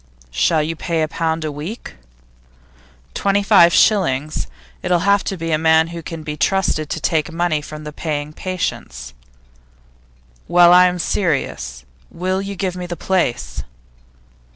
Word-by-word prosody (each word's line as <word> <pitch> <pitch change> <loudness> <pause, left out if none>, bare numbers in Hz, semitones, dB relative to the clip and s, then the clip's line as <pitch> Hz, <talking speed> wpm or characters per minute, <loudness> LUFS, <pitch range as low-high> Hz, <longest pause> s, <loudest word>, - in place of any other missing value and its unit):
'Shall 65 - +2
you 165 +2 -3
pay 165 0 -1
a - - 0
pound 160 0 -2
a 155 - -2
week?' 155 +11 -7 1.2
'Twenty 200 0 +1
five 195 -5 +6
shillings. 155 -10 +2 0.3
It'll 180 -1 +1
have 200 0 +3
to 195 - -3
be 165 0 -3
a 155 - +2
man 160 0 +4
who 170 0 -7
can 165 -1 -7
be 150 0 -5
trusted 155 -2 0
to - - -3
take 155 +1 0
money 165 -2 0
from 155 +1 -9
the 150 0 -7
paying 150 -1 -4
patients.' 65 - -4 1.3
'Well, 175 0 +6
I 180 0 +7
am 180 0 -2
serious. 135 - -2 0.2
Will 185 +2 -2
you 200 0 -5
give 185 -1 -2
me 180 -1 -5
the 175 -1 -5
place? 125 - -1
165 Hz, 150 wpm, -19 LUFS, 150-180 Hz, 1.3 s, I